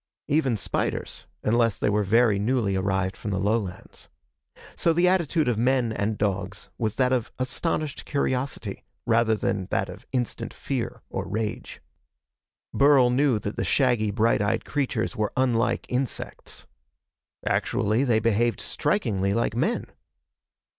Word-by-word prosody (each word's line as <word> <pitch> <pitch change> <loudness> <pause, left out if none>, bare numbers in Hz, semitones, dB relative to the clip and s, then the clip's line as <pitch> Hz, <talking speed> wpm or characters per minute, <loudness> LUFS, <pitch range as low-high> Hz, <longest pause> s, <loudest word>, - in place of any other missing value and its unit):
Even 140 -6 +2
spiders, - - -3 0.2
unless 115 -1 +2
they - - 0
were 105 +1 +2
very 105 +1 +3
newly 110 -2 +1
arrived 95 0 0
from 105 - -6
the 95 - -1
lowlands. 100 -3 -3 0.7
So 165 - +2
the 175 +2 +3
attitude 170 -4 +2
of 120 -3 +1
men 125 -1 +2
and 105 +1 -1
dogs 100 -1 -2
was 110 -2 -1
that 130 -1 +2
of 120 -3 -1
astonished 145 +3 -2
curiosity 135 -2 -2 0.2
rather 115 -1 +3
than 95 -3 -1
that - - -1
of - - -11
instant 125 -4 -3
fear - - -4
or - - -3
rage. 105 +2 -4 0.9
Burl 140 -3 +5
knew 130 -2 +3
that 105 0 -5
the - - 0
shaggy, 125 -6 +2
bright 110 +2 +2
eyed 100 +1 0
creatures 135 -6 -1
were 105 -1 -1
unlike 120 -3 +1
insects. 125 0 -3 0.8
Actually, 110 +6 +1
they 120 -5 +3
behaved 115 0 +1
strikingly 105 - 0
like 115 -1 0
men. 160 - 0
115 Hz, 140 wpm, -25 LUFS, 105-130 Hz, 0.9 s, Burl